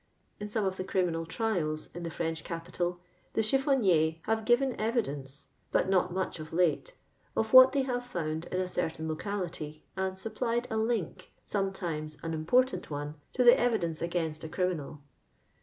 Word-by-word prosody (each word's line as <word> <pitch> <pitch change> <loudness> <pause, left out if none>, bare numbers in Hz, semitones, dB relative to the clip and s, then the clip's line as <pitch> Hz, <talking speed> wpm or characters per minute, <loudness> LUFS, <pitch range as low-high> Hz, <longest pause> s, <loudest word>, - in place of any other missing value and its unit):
In 210 - -4
some 210 0 -1
of 190 0 -1
tlie 185 - -4
criminal 170 -4 0
trials 165 -7 -1
in 175 - -6
the 170 - -3
French 165 0 -3
capital, 175 +1 -3 0.3
the - - +2
eliillbniiiers 215 - +3
have 220 0 0
given 250 +2 +3
evi 230 +2 +1
dence 140 -1 -8 0.2
(but - - +2
not 185 -1 +3
much 185 -2 -2
of 155 0 -8
late) 180 - +1 0.4
of 220 +1 0
what 255 0 +10
iheT 275 -2 +2
have 245 -2 -1
found 165 -8 -3
in 185 - -2
a 185 - 0
certain 160 -3 -2
locality, 160 -3 -4
and 190 0 -2
supplied 230 +4 -1
a 220 - 0
link, 220 -5 -2
sometimes 170 -6 -2
an 165 0 -2
important* 245 +12 +2
one, 145 0 -4 0.2
to 255 - +2
the 240 0 +9
e\i 240 -2 +3
dence 165 -5 -3
against 165 -2 -2
a 160 - -5
criminal. 155 -5 -2
180 Hz, 175 wpm, -30 LUFS, 160-220 Hz, 0.4 s, what